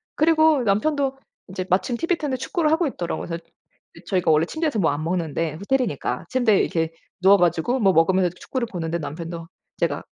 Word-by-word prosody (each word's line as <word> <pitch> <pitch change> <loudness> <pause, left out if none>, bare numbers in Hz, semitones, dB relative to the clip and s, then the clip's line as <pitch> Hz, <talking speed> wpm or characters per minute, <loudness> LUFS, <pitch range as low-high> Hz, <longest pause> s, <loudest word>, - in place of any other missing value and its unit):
그리고 315 -3 +4
남편도 270 +6 +1 0.3
인제 185 0 -5
마침 195 +7 +1
티브이 335 +4 0
트는데 280 -4 -2
축구를 315 +3 0
하고 325 +1 +2
있더라고요. 175 -10 -4
그래서 170 0 -5 0.5
그 - - -15
저희가 180 -4 +1
원래 155 +1 +4
침대에서 315 - -2
뭐 160 -5 +3
안 145 +2 -3
먹는데. 165 -2 -2
호텔이니까 235 +6 -1
침대에 240 -6 +3
이렇게 165 -1 0 0.3
누워 195 +2 +7
가지고 175 +9 +1
뭐 195 -4 +4
먹으면서 180 +3 +3
이렇게 175 +1 -9
축구를 255 -3 -3
보는데 170 -1 -3
남편도 165 +2 -6 0.3
제가 - - -1
190 Hz, 465 characters per minute, -23 LUFS, 170-265 Hz, 0.5 s, 누워